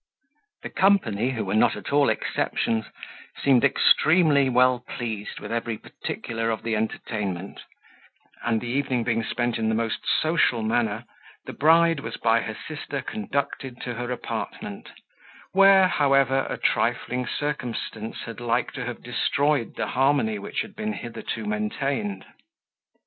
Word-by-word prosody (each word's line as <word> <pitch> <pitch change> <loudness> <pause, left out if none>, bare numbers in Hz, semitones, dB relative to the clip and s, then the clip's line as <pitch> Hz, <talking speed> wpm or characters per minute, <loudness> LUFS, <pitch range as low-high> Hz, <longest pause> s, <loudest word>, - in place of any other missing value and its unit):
The - - -6
company, 130 - +3
who 120 -5 -2
were 95 - -2
not 110 - +4
at - - -6
all 145 -1 +4
exceptions, 110 -1 -1 0.5
seemed 135 -3 +4
extremely 145 0 +4
well 125 0 +4
pleased 115 -4 -5
with - - -7
every 115 -1 -2
particular 115 +1 -4
of 110 -2 -2
the 115 -1 0
entertainment; 105 -3 -3 0.8
and 115 -2 +1
the 120 - -7
evening 130 -1 0
being 115 -1 0
spent 120 +1 -1
in 110 0 +1
the 110 - +1
most 115 -1 -1 0.2
social 155 -8 +2
manner, 110 0 0 0.4
the - - -7
bride 165 +1 +4
was 115 -3 -6
by 115 0 +3
her 110 -1 -5
sister 145 -3 -5
conducted 140 - -3
to 125 - -4
her 120 +1 -4
apartment, 125 - -5 0.6
where, 195 -1 +7
however, 135 -4 +3
a - - -3
trifling 125 -1 0
circumstance 120 -6 -4
had 115 -1 -8
like 120 0 0
to - - -5
have - - -6
destroyed 145 -4 0
the - - -2
harmony 130 -5 +2
which 100 - -3
had 220 -2 -8
been 215 0 -3
hitherto 120 - -5
maintained. 210 -3 -2
125 Hz, 145 wpm, -25 LUFS, 115-145 Hz, 0.8 s, where